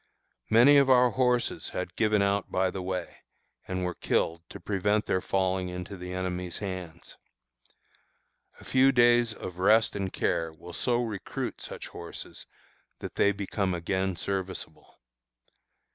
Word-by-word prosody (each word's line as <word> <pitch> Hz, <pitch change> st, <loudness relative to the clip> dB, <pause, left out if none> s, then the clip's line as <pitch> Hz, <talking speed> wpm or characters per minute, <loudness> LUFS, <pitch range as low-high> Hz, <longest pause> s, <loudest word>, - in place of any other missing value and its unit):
Many 125 Hz, +6 st, +7 dB
of 140 Hz, -1 st, +5 dB
our 125 Hz, -1 st, +6 dB
horses 125 Hz, -2 st, 0 dB
had 90 Hz, -1 st, -5 dB
given 105 Hz, -2 st, +2 dB
out 100 Hz, 0 st, 0 dB
by 95 Hz, 0 st, +1 dB
the 95 Hz, -, -5 dB
way, 90 Hz, -1 st, -4 dB, 0.5 s
and 95 Hz, -1 st, -2 dB
were 90 Hz, -, -2 dB
killed 85 Hz, -1 st, 0 dB
to -, -, -9 dB
prevent 105 Hz, +3 st, 0 dB
their 95 Hz, -, 0 dB
falling 95 Hz, -1 st, 0 dB
into 90 Hz, +2 st, -6 dB
the 90 Hz, -1 st, -7 dB
enemy's 90 Hz, -1 st, -3 dB
hands. 90 Hz, -4 st, -7 dB, 1.4 s
A -, -, -14 dB
few 130 Hz, +1 st, +4 dB
days 120 Hz, -2 st, +4 dB
of 90 Hz, -4 st, -8 dB
rest 110 Hz, +4 st, +4 dB
and 95 Hz, -2 st, -2 dB
care 80 Hz, -1 st, -1 dB
will 85 Hz, +2 st, -12 dB
so 120 Hz, +4 st, +1 dB
recruit 110 Hz, -4 st, -5 dB
such -, -, -7 dB
horses -, -, -8 dB, 0.5 s
that -, -, -7 dB
they 100 Hz, -, +3 dB
become 100 Hz, -1 st, -2 dB
again 95 Hz, +2 st, -1 dB
serviceable. 95 Hz, +1 st, -5 dB
95 Hz, 145 wpm, -28 LUFS, 90-110 Hz, 1.4 s, Many